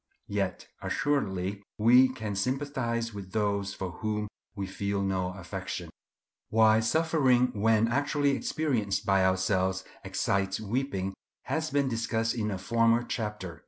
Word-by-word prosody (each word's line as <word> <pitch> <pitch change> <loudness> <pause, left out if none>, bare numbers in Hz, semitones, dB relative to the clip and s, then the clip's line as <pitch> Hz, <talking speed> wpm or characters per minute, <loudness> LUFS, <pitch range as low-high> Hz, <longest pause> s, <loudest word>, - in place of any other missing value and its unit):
Yet 100 -2 -2 0.2
assuredly 100 -9 -1 0.2
we 125 +4 +6
can 110 -5 -4
sympathize 120 0 -1
with 95 -2 -8
those 100 -2 0
for 95 -2 -4
whom 105 -1 -2 0.3
we 100 -1 -3
feel 100 +1 -2
no 95 -1 0
affection. 90 -3 -6 0.6
Why 110 0 +5
suffering, 130 -1 +3
when 110 +1 +3
actually 145 +3 +1
experienced 115 -10 -1
by 95 -2 +3
ourselves, 95 0 +1 0.2
excites 95 0 0
weeping, 110 -3 -2 0.3
has 160 0 -1
been 140 -1 +1
discussed 115 -1 0
in 110 -3 -1
a 100 - -2
former 115 +4 +2
chapter. 105 -8 -4
110 Hz, 125 wpm, -29 LUFS, 95-125 Hz, 0.6 s, we